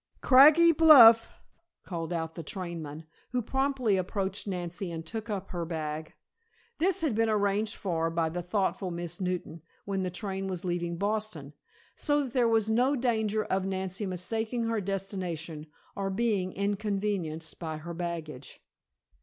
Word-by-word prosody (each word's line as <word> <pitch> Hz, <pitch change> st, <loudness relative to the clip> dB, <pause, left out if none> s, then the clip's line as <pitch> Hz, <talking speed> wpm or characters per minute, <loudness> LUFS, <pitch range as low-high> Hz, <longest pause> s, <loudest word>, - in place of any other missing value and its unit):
"Craggy 305 Hz, +6 st, +7 dB
Bluff!" 250 Hz, -8 st, +8 dB, 0.5 s
called 165 Hz, -2 st, -5 dB
out 160 Hz, -1 st, -3 dB
the 165 Hz, -, -6 dB
trainman, 165 Hz, -3 st, -6 dB, 0.3 s
who 250 Hz, -, +1 dB
promptly 265 Hz, -4 st, +1 dB
approached 190 Hz, +2 st, -3 dB
Nancy 175 Hz, -1 st, -4 dB
and 165 Hz, -1 st, -6 dB
took 220 Hz, +5 st, -6 dB
up 195 Hz, -2 st, -4 dB
her 175 Hz, -2 st, -3 dB
bag. 155 Hz, -1 st, -5 dB, 0.6 s
This 380 Hz, +2 st, +2 dB
had 310 Hz, -7 st, +1 dB
been 225 Hz, +1 st, +2 dB
arranged 210 Hz, 0 st, +1 dB
for 165 Hz, -4 st, -1 dB
by 165 Hz, -1 st, 0 dB
the 175 Hz, +2 st, -4 dB
thoughtful 190 Hz, +1 st, -1 dB
Miss 175 Hz, +1 st, -5 dB
Newton, 180 Hz, -3 st, -3 dB, 0.2 s
when 195 Hz, -1 st, -2 dB
the 185 Hz, -, -1 dB
train 195 Hz, +1 st, -4 dB
was 185 Hz, -2 st, -4 dB
leaving 175 Hz, -1 st, -2 dB
Boston, 200 Hz, -8 st, -3 dB, 0.4 s
so 290 Hz, -1 st, +1 dB
that 255 Hz, -3 st, -7 dB
there 245 Hz, -3 st, +3 dB
was 225 Hz, -2 st, +2 dB
no 250 Hz, +6 st, +2 dB
danger 220 Hz, -4 st, 0 dB
of 190 Hz, 0 st, 0 dB
Nancy 190 Hz, +1 st, -3 dB
mistaking 220 Hz, +6 st, -2 dB
her 225 Hz, -2 st, -1 dB
destination, 180 Hz, -5 st, -4 dB, 0.3 s
or 195 Hz, -1 st, -2 dB
being 195 Hz, -2 st, 0 dB
inconvenienced 200 Hz, -5 st, -2 dB
by 160 Hz, -2 st, -4 dB
her 170 Hz, +3 st, -7 dB
baggage. 165 Hz, -5 st, -6 dB
195 Hz, 150 wpm, -29 LUFS, 170-220 Hz, 0.6 s, Bluff